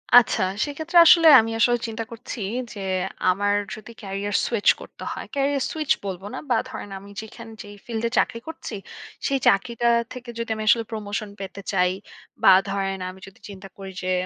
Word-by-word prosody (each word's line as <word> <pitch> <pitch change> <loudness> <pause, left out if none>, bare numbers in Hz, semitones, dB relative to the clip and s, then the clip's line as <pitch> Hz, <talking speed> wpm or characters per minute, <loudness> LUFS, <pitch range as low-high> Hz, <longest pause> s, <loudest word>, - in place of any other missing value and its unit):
আচ্ছা 240 -5 +6 0.2
সেক্ষেত্রে 315 +4 -2
আসলে 330 0 +7
আমি 225 +1 -4
আসলে 240 +1 +4
চিন্তা 225 0 -4
করছি 230 +1 -8 0.3
যে 205 - -9 0.5
আমার 205 +2 +1 0.2
যদি 215 +2 -11
ক্যারিয়ার 200 +1 -3
সুইচ 230 -4 -2
করতে - - -11
হয়। - - -6
ক্যারিয়ার 275 -1 +1
সুইচ 310 -2 -2
বলব 190 -2 -4
না, - - -4
বা 235 - +3
ধরেন 205 - -7
আমি 200 +1 -13
যেখানে 225 +1 -11
যে - - -10 0.2
ফিল্ডে 230 0 -2
চাকরি 230 - +1
করছি 320 -8 -7 0.5
সেই 275 -1 +1
চাকরিটা 235 +5 +2 0.3
থেকে 250 -1 -9
যদি 230 -1 -4
আমি 215 - -4
আসলে 230 +2 +5
প্রমোশন 210 -1 -4
পেতে 195 0 -7
চাই, 180 -2 +2 0.5
বা - - +9 0.2
ধরেন 195 -1 -2
আমি 185 - -11
যদি 195 +4 -16
চিন্তা 195 0 -10
করি 195 -1 -8
যে 185 - -1
220 Hz, 175 wpm, -24 LUFS, 195-240 Hz, 0.5 s, বা